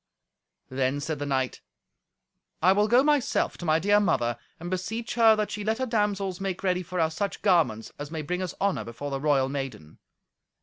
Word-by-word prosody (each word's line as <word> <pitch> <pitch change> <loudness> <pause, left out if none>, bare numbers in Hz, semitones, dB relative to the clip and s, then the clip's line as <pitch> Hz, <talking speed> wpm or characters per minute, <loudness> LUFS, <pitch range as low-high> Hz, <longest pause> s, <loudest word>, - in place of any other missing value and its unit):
Then 130 +1 0
said 150 0 -3
the 145 - -3
knight, 130 -2 -1 1.0
"I 185 - +5
will 205 +2 +3
go, 245 +4 +5
myself, 295 -3 +1
to 175 - -6
my 155 -1 +3
dear 205 +5 +3
mother, 120 - +1 0.2
and 175 +2 -6
beseech 220 +6 -3
her 225 -2 +6
that 210 -1 -2
she 210 - -4
let 220 +2 0
her 260 - -1
damsels 205 -5 -1
make 190 -1 -3
ready 180 -1 +1
for 180 0 -5
us 160 -1 +1
such 200 0 -3
garments 160 - +2
as 145 0 -5
may 160 -1 -4
bring 180 +5 -2
us 185 - -4
honour 200 -1 0
before 140 +5 -6
the 135 0 -3
royal 140 -3 +3
maiden." 135 - -6
180 Hz, 200 wpm, -27 LUFS, 140-205 Hz, 1.0 s, her